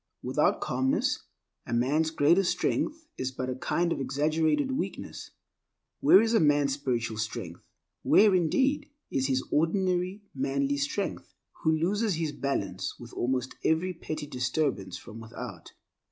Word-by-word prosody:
Without - - +2
calmness 130 +1 0 0.4
a - - -3
man's 145 +7 +2
greatest 170 +4 +3
strength 320 +1 -1
is 130 0 -1
but 130 0 -3
a - - -3
kind 170 +6 0
of - - -5
exaggerated 155 - +1
weakness. 290 - -5 0.7
Where 195 - +7
is 225 0 +1
a 225 - +5
man's 145 -2 +3
spiritual 120 -5 -2
strength—where 110 - +1
indeed, 265 - +2 0.2
is 130 0 +1
his 130 -1 +1
ordinary 185 +4 +1
manly 140 +1 0
strength— 145 +8 -3 0.3
who 160 0 +3
loses 200 +4 +1
his 160 -2 -1
balance 100 -11 -3
with 120 0 -11
almost 130 0 -1
every 170 +4 +1
petty 155 -3 -5
disturbance 125 - -1
from 115 -1 -11
without? 115 0 -9
145 Hz, 135 wpm, -28 LUFS, 130-175 Hz, 0.7 s, Where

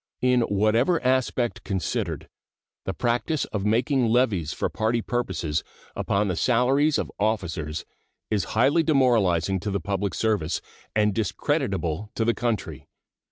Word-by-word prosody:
In 125 -1 +4
whatever 115 - +2
aspect 130 -2 0
considered, 95 -3 -2 0.6
the 95 - -2
practice 120 +4 0
of 100 -2 -4
making 120 +3 +2
levies 110 -9 +2
for - - -1
party 110 +2 0
purposes 95 -10 -2 0.3
upon 100 +1 0
the 90 - -1
salaries 130 - +3
of - - -3
officers 85 -8 -2 0.5
is 100 -5 +1
highly 140 +8 +4
demoralizing 110 - +2
to 105 - -4
the 100 0 -1
public 100 +1 -2
service 105 -7 0 0.4
and 105 -1 +3
discreditable 100 -3 -1
to 115 - 0
the 115 - +3
country. 120 -3 -3
110 Hz, 130 wpm, -25 LUFS, 95-125 Hz, 0.6 s, In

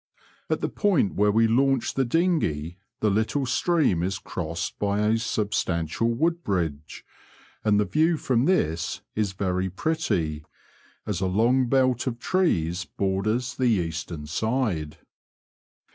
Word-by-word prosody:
At - - 0
the - - 0
point 185 - +1
where 105 0 +3
we 115 +2 +4
launched 135 +2 +2
the 135 - +2
dinghey 115 - 0 0.2
the 105 - +3
little 110 +7 0
stream 130 - +2
is 95 +2 -1
crossed 85 -2 -5
by 100 0 0
a 110 +2 +2
substantial 105 -3 -1
wood 165 +8 0
bridge, 80 -6 -3 0.6
and 105 -1 +3
the 105 - +2
view 160 +5 +2
from 125 -3 +1
this 85 - 0
is 105 -3 -1
very 95 -1 -1
pretty, 90 - -1 0.6
as 95 -3 -2
a 95 - +1
long 120 +7 +2
belt 130 -1 +2
of 120 -2 -2
trees 90 - 0
borders 110 +8 -1
the 130 -2 +1
eastern 85 -5 -2
side. 95 - -1
105 Hz, 135 wpm, -25 LUFS, 90-130 Hz, 0.6 s, we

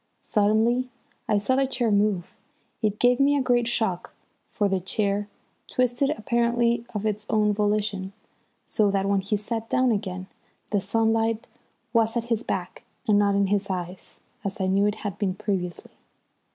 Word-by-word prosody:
Suddenly 220 +4 +2 0.4
I 210 - +3
saw 210 +6 +1
the 270 0 +2
chair 245 -4 0
move. 200 -3 +1 0.5
It 210 -2 0
gave 245 +2 +4
me 285 +1 +4
a 275 - +1
great 245 -2 +2
shock, 220 -7 -1 0.3
for 205 - 0
the 195 -1 +1
chair 200 +2 -1 0.4
twisted 255 +2 +1
apparently 235 -2 +1
of 210 +1 -2
its 210 0 -2
own 210 -2 +3
volition, 205 -2 0 0.5
so 210 -3 +2
that 195 -1 +1
when 200 -1 +2
he 205 +2 -1
sat 225 +2 -4
down 255 -1 +3
again 190 -3 -2 0.5
the 205 -2 +2
sunlight 225 +2 +1 0.5
was 225 0 +2
at 235 - 0
his 225 - -1
back - - -4 0.3
and 205 -1 +5
not 200 -1 +3
in 200 0 +3
his 200 0 0
eyes, 180 0 -5 0.3
as 200 -1 -4
I 190 - +1
knew 195 +2 +3
it 210 - 0
had 200 -1 -4
been 190 -3 0
previously. 190 -4 -3
210 Hz, 165 wpm, -25 LUFS, 200-235 Hz, 0.5 s, and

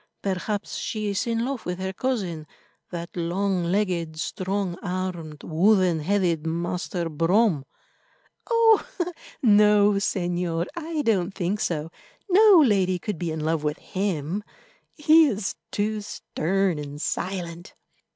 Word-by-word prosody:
"Perhaps 200 +2 -2
she 215 -2 -3
is 200 +3 -1
in 230 0 0
love 265 -3 -3
with 180 0 -3
her 190 0 -3
cousin, 190 -11 -2 0.4
that 170 -1 -7
long 180 +2 0
legged, 170 -4 -1
strong 185 +1 -2
armed, 180 -5 -4
wooden 180 0 +3
headed 175 -2 +1
Master 175 +1 -2
Brome." 165 0 +2 0.8
"Oh! 450 -5 +3 0.3
no, 210 -2 +6
Señor, 175 -3 -1
I 325 -2 -3
don't 195 -5 +1
think 195 +2 -1
so; 165 -4 -2 0.4
no 390 -3 +7
lady 190 -5 +2
could 195 -1 -5
be 175 - -2
in 155 0 -4
love 160 0 0
with 150 0 -1
him—he 210 - 0
is 210 -6 -2 0.2
too 210 +1 -1
stern 190 -3 -1
and 145 0 -7
silent." 175 0 -4
185 Hz, 120 wpm, -25 LUFS, 170-210 Hz, 0.8 s, no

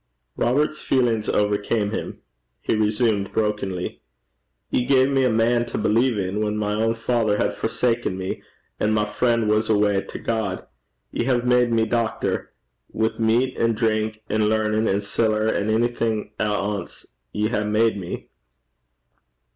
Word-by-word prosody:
Robert's 150 +5 +1
feelings 120 -5 +1
overcame 105 +1 +1
him. - - -5 0.4
He - - -1
resumed, 105 -1 +1
brokenly, 105 -4 -2 0.7
'Ye 125 - +2
gae 130 0 +4
me 135 -1 +2
a 130 - +3
man 115 +1 +2
to - - -4
believe 115 +2 +2
in, 100 +2 -2
whan 105 0 -1
my 105 0 -1
ain 115 0 +1
father 115 -3 +1
had - - 0
forsaken 115 -3 -1
me, 95 0 -4 0.4
and 110 +1 +1
my 105 -1 +2
frien' 115 +1 +1
was 105 +1 +1
awa 105 -2 +3
to - - -8
God. 110 -5 -2 0.5
Ye - - -1
hae 125 -2 +2
made 125 0 +3
me, 115 -1 +3
doctor. 115 -1 -1 0.4
Wi' 110 +1 -1
meat 115 +4 +2
an' 115 0 +2
drink 110 -1 -1
an' 110 0 +1
learnin' 110 0 +1
an' 100 +1 +1
siller, 110 +1 0
an' 105 -1 0
a'thing 115 -1 0
at 105 - +1
ance, 105 -2 -3 0.3
ye 105 +1 0
hae 105 -3 0
made 110 +2 +2
me.' 90 - -6
110 Hz, 155 wpm, -23 LUFS, 105-115 Hz, 0.7 s, gae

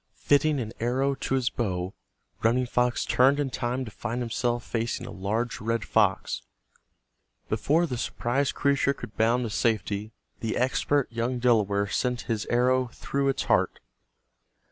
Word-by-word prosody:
Fitting 145 0 +3
an 115 -2 -4
arrow 130 +4 +1
to 135 0 -2
his 125 -3 +1
how, 95 -4 -2 0.5
Running 120 +3 +3
Fox 125 0 +1
turned 135 +3 +4
in 140 -3 -1
time 125 +2 -2
to 110 - -8
find 120 +4 -4
himself 120 0 -1
facing 115 0 -2
a - - -7
large 110 +6 -2
red 115 0 -1
fox. 105 -4 +1 1.1
Before 145 +10 +2
the 125 -7 -4
surprised 130 +5 -1
creature 140 -1 +2
could 115 -5 -9
bound 115 +4 +2
to 115 - -3
safety 105 -1 0 0.3
the 110 -1 -2
expert 130 +2 +1
young 120 +2 -1
Delaware 105 -5 +2
sent 125 +4 -1
his 110 -3 -3
arrow 125 +1 +2
through 140 +3 -2
its 135 - 0
heart. - - +1
120 Hz, 150 wpm, -27 LUFS, 110-130 Hz, 1.1 s, turned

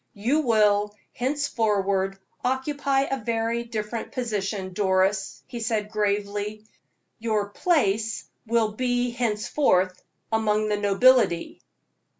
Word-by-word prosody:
"You 240 +9 +1
will, 210 -5 +3 0.2
henceforward, 210 -8 0 0.3
occupy 270 +2 0
a 270 -3 -2
very 230 +1 -1
different 225 0 -4
position, 205 -6 -3
Doris," 190 0 +1
he 240 - -7
said, 220 -2 -1
gravely; 210 0 -1 0.5
"your 215 -3 0
place 220 - +1 0.2
will 225 -1 +2
be 245 +2 0
henceforth 215 -4 +1 0.3
among 215 -1 +1
the 210 - +1
nobility." 205 -2 +3
215 Hz, 100 wpm, -25 LUFS, 205-245 Hz, 0.5 s, will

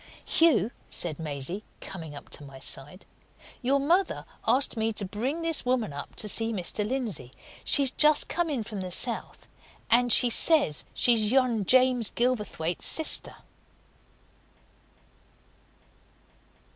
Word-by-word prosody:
"Hugh," 255 - +2 0.2
said 165 -3 -1
Maisie, 155 +6 -5 0.2
coming 160 -6 -9
up 145 - -12
to - - -5
my 135 -1 -13
side, 140 +6 -4 0.6
"your 275 +2 +1
mother 345 +7 0 0.2
asked 270 0 +3
me 225 0 -1
to 210 - -2
bring 250 - -4
this 330 -2 +2
woman 245 - -2
up 145 - -8
to 215 - -2
see 225 +2 +3
Mr. 210 0 -2
Lindsey. 215 - -2 0.3
She's 275 -3 +3
just 305 0 +4
come 345 -1 -2
in 265 -7 -3
from 210 -2 -7
the 185 - -6
south, 230 +6 -3 0.4
and 245 +1 +4
she 240 +2 +6
says 295 - +3
she's 225 -3 +2
yon 250 -6 +1
James 255 -1 +3
Gilverthwaite's 210 -9 -2
sister." 320 - +2
225 Hz, 130 wpm, -26 LUFS, 185-260 Hz, 0.6 s, she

